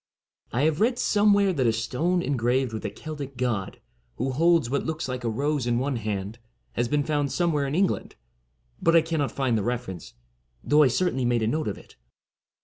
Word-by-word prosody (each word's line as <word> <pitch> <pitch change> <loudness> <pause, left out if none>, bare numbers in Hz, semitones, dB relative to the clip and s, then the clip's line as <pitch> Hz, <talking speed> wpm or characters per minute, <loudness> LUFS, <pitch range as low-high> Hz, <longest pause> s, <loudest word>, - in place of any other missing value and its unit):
I 125 +4 0
have 155 +2 +1
read 240 +3 +3
somewhere 205 -3 +3
that 130 -7 +1
a - - +4
stone 130 +11 0
engraved 125 -1 0
with 110 - -5
a - - -1
Celtic 140 0 -8
god, 115 -6 -2 0.4
who 130 +3 -2
holds 165 0 +3
what 140 +3 -1
looks 160 -2 -3
like 125 -1 -4
a 115 - 0
rose 140 +2 -1
in 120 -1 +2
one 130 +1 -1
hand, 105 0 -4 0.3
has 120 +1 -1
been 145 +3 +1
found 145 -2 -1
somewhere 155 -5 +1
in 140 - -2
England; 190 +2 0 0.7
but 165 0 +4
I 165 - +6
cannot 160 -4 -1
find 130 -4 0
the 110 - +1
reference, 120 - -4 0.5
though 150 +1 +4
I 145 - +6
certainly 130 +1 0
made 120 -2 +1
a - - +1
note 155 +7 -1
of 105 - -3
it. - - -17
135 Hz, 200 wpm, -26 LUFS, 120-160 Hz, 0.7 s, I